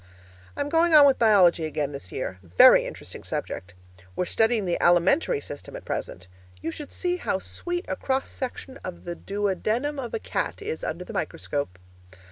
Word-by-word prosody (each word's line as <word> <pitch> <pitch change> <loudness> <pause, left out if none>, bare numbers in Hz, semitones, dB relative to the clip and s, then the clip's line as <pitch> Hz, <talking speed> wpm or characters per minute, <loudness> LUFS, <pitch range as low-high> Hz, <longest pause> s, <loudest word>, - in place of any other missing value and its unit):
I'm 285 - -1
going 330 +2 +4
on 295 -1 +10
with 275 -2 +4
biology 190 -7 +5
again 150 -2 -2
this 140 -11 -9
year 90 - -4
very 90 -1 +6
interesting - - -8
subject; 90 -1 -5 0.4
we're - - 0
studying 225 +1 +2
the 175 - -1
alimentary 175 - +3
system 145 0 -9
at - - -9
present. 90 +1 -5 0.3
You 165 - -3
should 290 - -8
see 360 -1 -1
how 265 - -1
sweet 350 - -5
a - - -2
cross 265 0 -1
section 260 +1 -6
of 185 -8 -8
the 175 - -3
duodenum 210 +10 -1
of 245 -3 -4
a - - -2
cat - - -3
is 440 +3 -5
under - - -3
the - - -9
microscope. 140 -11 -3
205 Hz, 175 wpm, -26 LUFS, -, 0.4 s, on